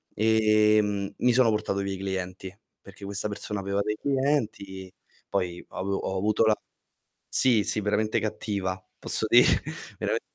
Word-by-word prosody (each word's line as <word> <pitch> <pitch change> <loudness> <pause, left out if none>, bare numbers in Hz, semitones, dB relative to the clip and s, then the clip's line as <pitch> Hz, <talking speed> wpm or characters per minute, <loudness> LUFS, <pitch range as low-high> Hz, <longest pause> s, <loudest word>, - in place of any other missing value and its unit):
ehm, 105 -2 +3
mi 125 -1 +3
sono 125 -2 +5
portato 105 -2 -1
via 100 0 -2
i - - -5
clienti, 95 -1 -5 0.3
perché 100 0 -12
questa 100 +1 -2
persona 105 0 -4
aveva 100 +1 -1
dei 105 +1 -1
clienti, 110 -10 -1 0.4
poi 90 -3 -2
ho - - -11
avu 100 +1 -2
ho 95 0 -2
avuto 105 +3 +2
la 110 -1 +4 0.7
sì, 115 -5 +3
sì 105 - 0
veramente 105 +2 +1
cattiva, 100 -3 -3 0.2
posso - - 0
dire. - - +7 0.5
Verame - - -1
105 Hz, 150 wpm, -27 LUFS, 95-110 Hz, 0.7 s, dire